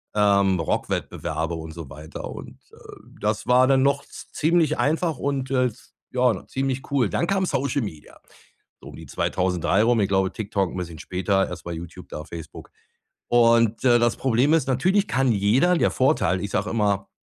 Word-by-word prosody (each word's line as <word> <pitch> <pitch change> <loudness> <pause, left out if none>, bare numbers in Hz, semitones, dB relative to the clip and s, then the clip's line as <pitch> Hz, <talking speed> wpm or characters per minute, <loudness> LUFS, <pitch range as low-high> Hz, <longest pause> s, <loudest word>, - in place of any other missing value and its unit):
ähm, 100 -3 +3
Rockwettbewerbe 80 +1 -2
und 80 0 -7
so 80 -4 -9
weiter. 75 +3 -9
Und, - - -10
äh, - - -18 0.4
das 105 0 -1
war 125 +1 +5
dann 135 -1 +4
noch 140 +1 +1
z - - -12
ziemlich 160 -1 +2
einfach 160 +2 0
und, 135 -2 -2
äh, 130 -1 +3
s 120 -1 -7 0.2
ja, 125 -2 +1
ziemlich 135 0 -3
cool. 130 -7 +2
Dann 170 - -1
kam 190 0 +1
Social 140 -3 -1
Media 80 -9 -8 0.6
so - - -12
um - - -11
die - - -11
2003 90 +2 0
rum. 120 0 +3
Ich 100 - +2
glaube, 95 -1 +1
TikTok 100 -4 -2
'n - - -7
bisschen 85 -3 -6
später, 95 +3 0
erstmal 85 -1 -6
YouTube, 85 0 -9
da 75 - -6
Facebook. 80 0 -10 0.6
Und, 115 -1 +3
äh, 120 -2 +5
das 120 -1 +2
Problem 130 +4 +2
ist, 155 -5 +2
natürlich 185 +11 +2
kann 130 -2 +1
jeder 120 - +3
der - - +2
Vorteil, 130 -9 +1
ich 100 - -4
sage 100 +3 -1
immer, 105 -3 0
115 Hz, 180 wpm, -23 LUFS, 95-135 Hz, 0.6 s, war